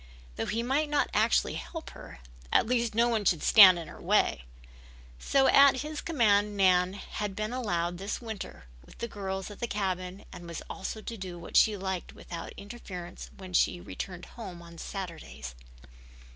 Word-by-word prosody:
Though - - -3
he 225 +4 -1
might 285 +5 +1
not 295 -1 +1
actually - - +3
help 325 -2 -7
her, 65 - -12 0.3
at - - +4
least 235 -2 0
no 235 +1 +4
one 225 -3 +1
should 175 -5 +2
stand 190 -5 +9
in 165 -2 -6
her - - -11
way. - - +2 0.7
So 270 - +3
at 275 -2 +6
his 305 0 -5
command 210 -9 +2
Nan 185 -1 +4
had 205 0 -5
been 215 +3 -3
allowed 175 -8 -1
this 200 +3 -3
winter 220 - -7 0.2
with - - -17
the 235 - -3
girls 195 -2 -5
at 205 - -11
the 235 - -2
cabin 190 -2 -3
and 175 -1 -9
was 170 -1 -6
also 215 +3 -6
to 230 - -6
do 185 -3 -6
what 170 - -10
she 215 -2 +5
liked 190 -2 -4
without 170 -1 -8
interference 195 -4 -8
when 185 -2 -10
she 175 - +3
returned 180 0 -7
home 185 -7 -9
on 170 -1 -12
Saturdays. 170 - -7
195 Hz, 175 wpm, -29 LUFS, 180-230 Hz, 0.7 s, stand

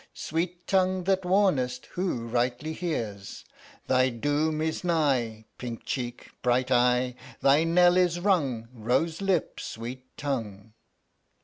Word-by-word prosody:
Sweet 170 +5 -3
tongue 185 -1 +2
that 190 0 +1
warnest 165 -10 +2
Who 175 -11 -2
rightly 125 +6 -1
hears. 110 - -4 0.4
Thy 130 0 +3
doom 145 +6 0
is 160 +2 -2
nigh, 130 -10 +1
Pink 120 -2 -6
cheek, 120 -2 -4
bright 125 +1 +1
eye! 125 0 +3 0.3
Thy 145 +4 +5
knell 175 +1 +5
is 175 -1 +2
rung, 145 - +1
Rose 130 - 0
lip, 190 -4 0
sweet 125 +3 -7
tongue. 110 -7 -4
140 Hz, 120 wpm, -27 LUFS, 120-175 Hz, 0.4 s, Thy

